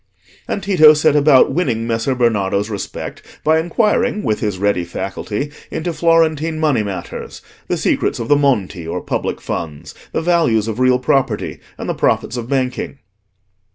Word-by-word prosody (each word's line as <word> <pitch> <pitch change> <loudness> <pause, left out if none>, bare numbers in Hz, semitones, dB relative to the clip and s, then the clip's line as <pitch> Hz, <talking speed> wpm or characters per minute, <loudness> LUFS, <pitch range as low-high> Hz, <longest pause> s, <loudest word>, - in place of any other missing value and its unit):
And 200 - -3
Tito 155 -6 +6
set 150 0 +3
about 145 -2 +5
winning 120 -10 0
Messer 115 +3 -1
Bernardo's 105 -3 +1
respect 100 - -6 0.2
by 160 +1 +3
inquiring, 210 +6 +1
with 110 -2 0
his 105 -3 -2
ready 100 -2 +1
faculty, 100 +9 -4 0.2
into 170 +1 -3
Florentine 165 -1 +2
money 150 -7 +2
matters, 100 -3 -6 0.2
the - - -1
secrets - - 0
of 115 - -4
the 145 - +5
Monti 105 - 0
or 85 - -3
public - - -3
funds, 80 -2 -5 0.2
the - - -2
values 160 -11 +2
of 110 +1 -3
real 130 0 +4
property, 125 -3 0 0.2
and - - -6
the - - 0
profits 120 - 0
of 120 -1 -5
banking. 130 0 -2
130 Hz, 155 wpm, -18 LUFS, 105-155 Hz, 0.2 s, Tito